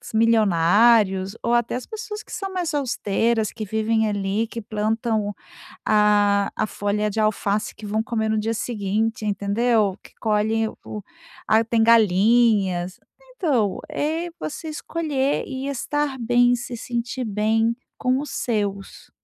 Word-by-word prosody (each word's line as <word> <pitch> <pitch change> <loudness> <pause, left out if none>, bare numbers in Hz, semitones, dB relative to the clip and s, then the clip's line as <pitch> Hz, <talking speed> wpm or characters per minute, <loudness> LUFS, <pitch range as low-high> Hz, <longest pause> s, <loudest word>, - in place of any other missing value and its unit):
milionários 205 -1 +4
ou 235 - +1
até 240 0 +1
as 250 - -5
pessoas 430 -1 -7
que - - -16
são 390 -1 -4
mais 355 -4 -2
austeras 230 -4 0
que 220 -2 -6
vivem 220 +1 +1
ali, 205 +2 -1
que 230 +1 -6
plantam 215 0 -1 0.5
a 205 -1 +3
a - - 0
folha 210 +1 -1
de 210 - -3
alface 215 -1 0
que 215 - -10
vão 215 +1 0
comer 220 -1 -1
no 215 0 +1
dia 225 +2 -1
seguinte, 220 0 -2
entendeu, 205 +1 +1
que - - -16
colhe 220 +1 +1 0.2
o 210 -1 -7 0.4
"Ah, 220 +1 +4
tem 225 0 +1
galinhas", 210 -4 +3 0.4
então, 255 - +1
é 320 +4 -2
você 315 +1 -5
escolher 300 -3 -1
e 265 0 -5
estar 280 +1 -2
bem, 245 +1 +3
se 240 0 -6
sentir 240 +2 -3
bem 220 +2 +1 0.2
com 255 0 +1
os 290 - -7
seus. 205 -4 -3
225 Hz, 140 wpm, -23 LUFS, 210-245 Hz, 0.5 s, milionários